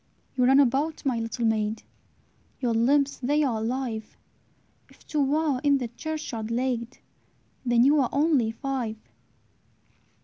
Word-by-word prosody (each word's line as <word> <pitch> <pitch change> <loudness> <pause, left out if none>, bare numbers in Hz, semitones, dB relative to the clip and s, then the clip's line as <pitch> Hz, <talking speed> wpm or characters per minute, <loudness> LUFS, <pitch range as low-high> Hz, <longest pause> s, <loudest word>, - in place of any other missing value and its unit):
"You 250 -1 +3
run 265 +2 +6
about, 285 +4 +1
my 250 -4 +1
little 230 +1 -3
maid, 215 -1 0 0.8
Your 240 -3 0
limbs 275 +5 +2
they 290 +4 +1
are 240 -6 0
alive; 230 -1 -4 0.7
If - - -21
two 285 -1 +1
are 300 -5 0
in 285 -1 +4
the 245 -3 -4
churchyard 240 -5 -5
laid, 245 0 -2 0.7
Then 240 -2 +3
ye 275 - +5
are 285 -5 +3
only 285 -6 +2
five." 240 -2 -3
255 Hz, 135 wpm, -26 LUFS, 230-280 Hz, 0.8 s, run